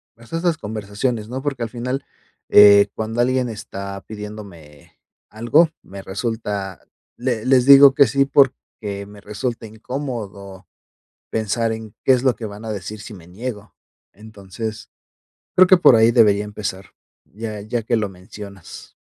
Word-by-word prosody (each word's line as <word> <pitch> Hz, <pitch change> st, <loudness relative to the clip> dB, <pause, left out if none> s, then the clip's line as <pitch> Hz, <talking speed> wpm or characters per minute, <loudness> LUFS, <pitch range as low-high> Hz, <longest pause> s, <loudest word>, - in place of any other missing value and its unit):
pues, 115 Hz, 0 st, -18 dB
esas 165 Hz, 0 st, 0 dB
conversaciones, 105 Hz, +1 st, -3 dB
¿no? 130 Hz, +1 st, -5 dB
Porque 135 Hz, -4 st, -3 dB
al 115 Hz, -, -4 dB
final, 125 Hz, +3 st, -4 dB, 0.4 s
eh, 100 Hz, 0 st, +8 dB
cuando 110 Hz, +2 st, -2 dB
alguien 125 Hz, 0 st, +1 dB
está 100 Hz, -2 st, -7 dB
pidiéndome, 90 Hz, -8 st, -11 dB, 0.3 s
algo, 120 Hz, +10 st, +3 dB
me 95 Hz, 0 st, -10 dB
resulta 100 Hz, -2 st, -4 dB, 0.4 s
Le 120 Hz, -3 st, -2 dB
les 130 Hz, -1 st, +4 dB
digo 140 Hz, 0 st, +9 dB
que 140 Hz, -1 st, +5 dB
sí, 140 Hz, 0 st, +2 dB
porque 115 Hz, -7 st, 0 dB
me 105 Hz, 0 st, -13 dB
resulta 115 Hz, +3 st, -5 dB
incómodo, 105 Hz, -5 st, -7 dB, 0.6 s
pensar 110 Hz, +1 st, -1 dB
en, 110 Hz, -1 st, -8 dB
qué 130 Hz, -, +5 dB
es 125 Hz, 0 st, 0 dB
lo 130 Hz, -3 st, +2 dB
que 115 Hz, -, -7 dB
van 105 Hz, +1 st, -9 dB
a 110 Hz, -, -4 dB
decir 105 Hz, +1 st, -6 dB
si 105 Hz, -, -10 dB
me 85 Hz, -4 st, -13 dB
niego. 105 Hz, +3 st, -7 dB, 0.4 s
Entonces, 105 Hz, +1 st, -8 dB, 0.7 s
creo 185 Hz, 0 st, +8 dB
que 185 Hz, -, +7 dB
por 130 Hz, -, +6 dB
ahí 115 Hz, +1 st, +5 dB
debería 105 Hz, -3 st, +4 dB
empezar, 100 Hz, -2 st, -6 dB, 0.3 s
ya 105 Hz, +5 st, -7 dB
ya 115 Hz, +2 st, -3 dB
que 115 Hz, +2 st, 0 dB
lo 105 Hz, -2 st, -1 dB
mencionas. 95 Hz, 0 st, -12 dB
110 Hz, 150 wpm, -20 LUFS, 100-125 Hz, 0.7 s, digo